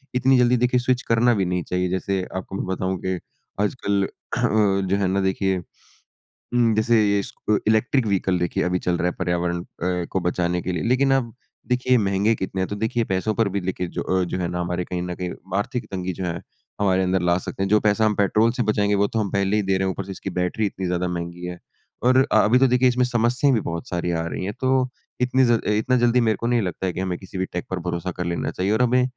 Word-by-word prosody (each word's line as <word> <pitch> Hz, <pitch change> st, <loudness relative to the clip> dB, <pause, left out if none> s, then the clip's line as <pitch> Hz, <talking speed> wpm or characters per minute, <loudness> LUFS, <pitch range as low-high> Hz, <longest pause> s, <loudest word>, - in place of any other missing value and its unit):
इतनी 130 Hz, +1 st, +4 dB
जल्दी, 125 Hz, 0 st, +4 dB
देखिए, 125 Hz, +1 st, +2 dB
स्विच 125 Hz, +1 st, +1 dB
करना 120 Hz, +1 st, +3 dB
भी 100 Hz, -4 st, +1 dB
नहीं 90 Hz, 0 st, -1 dB
चाहिए। 90 Hz, +1 st, -1 dB
जैसे 95 Hz, +1 st, -1 dB
आपको 95 Hz, +1 st, -5 dB
मैं -, -, -3 dB
बताऊँ 95 Hz, 0 st, -2 dB
कि 95 Hz, -1 st, -1 dB, 0.4 s
आजकल 100 Hz, -2 st, 0 dB
अ, -, -, -2 dB, 0.8 s
जो 95 Hz, -, +2 dB
है 100 Hz, -1 st, +1 dB
ना, 95 Hz, +1 st, +1 dB
देखिए 95 Hz, 0 st, 0 dB, 1.0 s
उम, 120 Hz, -2 st, +3 dB
जैसे 110 Hz, +1 st, +3 dB
ये 100 Hz, 0 st, +2 dB
इस 100 Hz, -, -5 dB, 0.2 s
अ, 105 Hz, -, +5 dB
इलेक्ट्रिक 110 Hz, +3 st, +2 dB
व्हीकल, 95 Hz, -2 st, +1 dB
देखिए, 85 Hz, -1 st, 0 dB
अभी 90 Hz, 0 st, 0 dB
चल 90 Hz, 0 st, 0 dB
रहा 90 Hz, -, 0 dB
है 90 Hz, -, -1 dB
पर्यावरण 85 Hz, -1 st, -1 dB
अ, -, -, -12 dB, 0.5 s
को 95 Hz, -, 0 dB
बचाने 90 Hz, 0 st, 0 dB
के 90 Hz, -, -3 dB
लिए। 85 Hz, -3 st, -2 dB
लेकिन 135 Hz, +2 st, +3 dB
आप 120 Hz, -4 st, 0 dB, 0.3 s
देखिए, 125 Hz, 0 st, +2 dB
महँगे 100 Hz, +1 st, +2 dB
कितने 95 Hz, -1 st, -3 dB
हैं, 95 Hz, -, 0 dB
तो 100 Hz, -, -3 dB
देखिए, 110 Hz, +3 st, 0 dB
पैसों 95 Hz, +3 st, -1 dB
पर 115 Hz, -3 st, +2 dB
भी -, -, +2 dB
लेके 90 Hz, 0 st, -3 dB
जो -, -, 0 dB
अ, 95 Hz, 0 st, +1 dB
जो 90 Hz, -, -3 dB
है 90 Hz, -, -1 dB
ना, 90 Hz, +1 st, -3 dB
हमारे 90 Hz, 0 st, -2 dB
कहीं 90 Hz, 0 st, -3 dB
न 90 Hz, 0 st, -4 dB
कहीं 90 Hz, 0 st, -4 dB, 0.3 s
आर्थिक 125 Hz, +4 st, -2 dB
तंगी 95 Hz, -1 st, -3 dB
जो 95 Hz, +2 st, -5 dB
है, 85 Hz, 0 st, -3 dB, 0.4 s
हमारे 95 Hz, -2 st, +3 dB
अंदर 95 Hz, 0 st, +1 dB
ला 85 Hz, 0 st, +2 dB
सकते 95 Hz, +1 st, -4 dB
हैं। 95 Hz, -, -1 dB
जो 105 Hz, +1 st, +5 dB
पैसा 105 Hz, +1 st, +2 dB
हम 110 Hz, -, +3 dB
पेट्रोल 105 Hz, +3 st, +3 dB
से 125 Hz, +1 st, -1 dB
बचाएँगे, 105 Hz, -2 st, +1 dB
वो 100 Hz, 0 st, +2 dB
तो 115 Hz, -, -2 dB
हम 105 Hz, -2 st, -1 dB
पहले 100 Hz, +1 st, +1 dB
ही 105 Hz, -, +1 dB
दे 95 Hz, 0 st, +1 dB
रहे 95 Hz, -, 0 dB
हैं, -, -, +1 dB
ऊपर 100 Hz, -, -5 dB
से 100 Hz, -, -7 dB
इसकी 95 Hz, -, -6 dB
बैटरी 90 Hz, +4 st, 0 dB
इतनी 95 Hz, -1 st, -3 dB
ज़्यादा 90 Hz, 0 st, -1 dB
महँगी 85 Hz, 0 st, -5 dB
है 90 Hz, 0 st, -6 dB, 0.4 s
और 130 Hz, +1 st, +4 dB
अ, -, -, +5 dB
अभी 120 Hz, +4 st, +4 dB
तो 135 Hz, -, +5 dB
देखिए, 125 Hz, +1 st, +3 dB
इसमें 125 Hz, 0 st, +2 dB
समस्याएँ 125 Hz, +3 st, +2 dB
भी 110 Hz, -, +1 dB
बहुत 85 Hz, -2 st, -5 dB
सारी 90 Hz, -1 st, -1 dB
आ 80 Hz, -1 st, -1 dB
रही 80 Hz, +2 st, -4 dB
हैं, 100 Hz, -, -3 dB
तो 130 Hz, 0 st, +2 dB, 0.3 s
इतनी 125 Hz, +1 st, +3 dB
ज़ल 120 Hz, -1 st, +3 dB
अ, -, -, -4 dB
इतना 110 Hz, +5 st, +2 dB
जल्दी 120 Hz, 0 st, +3 dB
मेरे 110 Hz, -3 st, +2 dB
को 115 Hz, -, 0 dB
नहीं 120 Hz, -1 st, +2 dB
लगता 95 Hz, -1 st, -3 dB
है 90 Hz, -, -1 dB
कि -, -, -5 dB
हमें 95 Hz, -1 st, -2 dB
किसी 95 Hz, 0 st, -9 dB
भी 95 Hz, -, 0 dB
टेक 90 Hz, -, -3 dB
पर 95 Hz, -, -2 dB
भरोसा 85 Hz, +1 st, -3 dB
कर 90 Hz, -, -2 dB
लेना 85 Hz, 0 st, -2 dB
चाहिए 95 Hz, +2 st, -1 dB
और 110 Hz, +3 st, +2 dB
हमें 125 Hz, +1 st, +3 dB
100 Hz, 255 wpm, -23 LUFS, 90-115 Hz, 1.0 s, अ